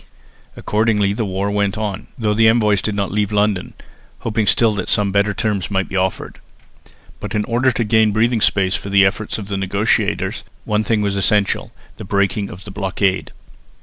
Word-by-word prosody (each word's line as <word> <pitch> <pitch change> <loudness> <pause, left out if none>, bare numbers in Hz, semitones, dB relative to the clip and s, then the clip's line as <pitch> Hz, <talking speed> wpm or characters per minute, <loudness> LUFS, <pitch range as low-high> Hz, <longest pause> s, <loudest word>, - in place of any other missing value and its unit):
Accordingly 105 -2 +1
the 110 +1 -2
war 100 +1 -2
went 100 -1 0
on, 105 -2 -4
though 110 -4 0
the 110 +1 +4
envoys 105 -4 +3
did 110 - -2
not 100 -2 -2
leave 105 0 0
London, 105 -3 0 0.5
hoping 110 -1 -1
still 115 +2 +4
that 100 -3 -4
some 100 -1 +1
better 100 +1 +2
terms 100 -2 -2
might 95 -1 -1
be - - -7
offered. 95 0 -2 0.8
But - - -5
in 105 0 0
order 125 +2 +2
to 120 - 0
gain 110 0 +3
breathing 115 +2 +1
space 95 -2 +2
for 100 - -3
the 100 0 +5
efforts 105 +2 -1
of 105 -3 -7
the 100 -1 -3
negotiators, 100 +3 0 0.2
one 105 0 0
thing 110 0 0
was 100 -1 -1
essential 100 0 +1 0.3
the - - -8
breaking 100 +1 0
of 95 - -10
the 100 - -9
blockade. 95 -1 -1
105 Hz, 185 wpm, -19 LUFS, 100-110 Hz, 0.8 s, the